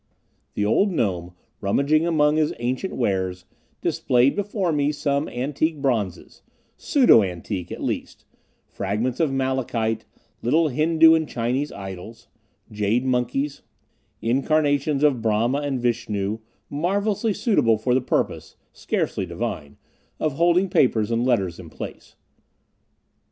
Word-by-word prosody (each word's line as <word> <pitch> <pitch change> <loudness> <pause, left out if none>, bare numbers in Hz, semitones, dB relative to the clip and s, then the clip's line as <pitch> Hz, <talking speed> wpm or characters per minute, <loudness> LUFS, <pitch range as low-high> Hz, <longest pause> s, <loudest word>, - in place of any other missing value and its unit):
The 105 - 0
old 195 - +3
gnome, 90 - -2 0.2
rummaging 140 +11 +2
among 150 -2 +3
his 155 -1 +1
ancient 125 +10 -2
wares, 95 -5 -1 0.4
displayed 125 +2 +2
before 200 -3 -1
me 145 -1 +1
some 145 0 -1
antique 145 +5 -1
bronzes 115 -10 -2 0.3
pseudo 255 - +5
antique, 90 0 -4
at - - -6
least, - - -4 0.4
fragments 110 +6 -2
of 160 -4 +2
malachite, 125 -4 -1 0.4
little 155 +6 +2
Hindu 160 +4 +5
and 160 -1 +1
Chinese 125 +5 -1
idols, 95 +3 -9 0.4
jade 105 +4 0
monkeys, 130 +3 -1 0.6
incarnations 145 +3 +1
of 140 -6 +3
Brahma 115 +5 +1
and 140 -3 -2
Vishnu, 110 -3 -1 0.3
marvelously 200 +8 0
suitable 200 - +2
for 125 +3 0
the 130 - +3
purpose - - -2 0.2
scarcely - - -2
divine 70 -1 -5 0.4
of 155 -2 0
holding 175 +5 +3
papers 115 - +2
and 115 +1 +1
letters 100 -9 0
in 85 -3 -10
place. - - -9
130 Hz, 120 wpm, -23 LUFS, 110-150 Hz, 0.6 s, pseudo